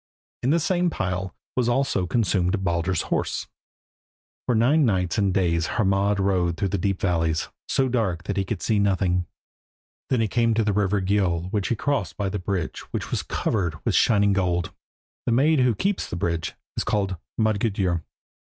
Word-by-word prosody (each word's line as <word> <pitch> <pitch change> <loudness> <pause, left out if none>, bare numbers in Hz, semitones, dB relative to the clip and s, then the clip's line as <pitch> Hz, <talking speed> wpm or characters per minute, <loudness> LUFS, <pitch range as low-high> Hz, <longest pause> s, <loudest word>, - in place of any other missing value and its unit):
In 125 - 0
the 165 +4 +4
same 175 +1 +1
pile 95 - -3 0.2
was 125 -2 +1
also 120 -7 +1
consumed 95 -3 +1
Baldur's 85 0 0
horse. - - -1 1.0
For 125 - +2
nine 135 +8 +4
nights 95 -4 +1
and 100 -2 +2
days 85 -3 +1
Hermod 100 -1 +2
rode 90 -3 +1
through 100 -2 0
deep 100 0 -1
valleys, 80 -3 0 0.2
so 135 -1 +2
dark 105 -9 -1
that 100 - -3
he 100 - +1
could 95 0 -4
see 110 -3 +2
nothing. 95 -3 +1 0.8
Then 130 - +2
he 110 - +2
came 115 +1 +2
to 110 - +2
the 105 -1 +1
river 100 -1 +1
Gjöll 95 -3 0
which 100 -3 0
he 120 - +1
crossed 110 - -1
by 100 -1 -1
the 105 - -3
bridge 90 -2 -3
which - - -4
is - - +1
covered 90 -7 -1
with - - +1
shining 100 -3 +4
gold. 90 -1 0 0.5
The 120 - +3
maid 145 +5 +4
who 125 -3 +3
keeps 195 - -1
the - - -4
bridge 85 -3 -2 0.2
is - - -1
called 95 -3 -1 0.2
Modgudur. 100 -5 +1
100 Hz, 175 wpm, -24 LUFS, 90-115 Hz, 1.0 s, the